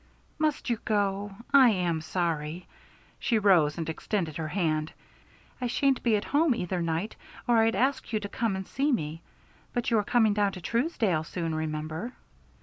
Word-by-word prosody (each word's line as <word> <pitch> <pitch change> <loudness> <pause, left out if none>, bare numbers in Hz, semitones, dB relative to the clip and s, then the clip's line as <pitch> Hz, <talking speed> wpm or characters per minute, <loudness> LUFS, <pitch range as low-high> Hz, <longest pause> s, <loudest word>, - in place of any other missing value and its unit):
"Must 305 -1 0
you 235 -3 0
go? 205 -2 0 0.2
I 265 -3 +8
am 175 -6 0
sorry." 165 0 -2 0.5
She 230 - +1
rose 175 -8 +4
and 165 -2 -3
extended 165 -1 -2
her 160 -1 -3
hand. 155 -3 0 0.7
"I 250 - 0
shan't 270 +2 +2
be 230 -3 +3
at 205 - -1
home 290 -2 +3
either 180 -4 -2
night 170 +5 -2 0.3
or 240 -1 +4
I'd 225 0 +3
ask 260 0 0
you 215 - +1
to 205 - -5
come 220 0 -1
and 190 0 -5
see 285 +2 0
me. 160 - -2 0.5
But 240 -1 -1
you 225 - +4
are - - 0
coming 220 -1 +3
down 205 -1 +1
to - - -7
Truesdale 225 - 0
soon, 165 0 -3
remember." 155 +7 -3
200 Hz, 175 wpm, -28 LUFS, 165-235 Hz, 0.7 s, I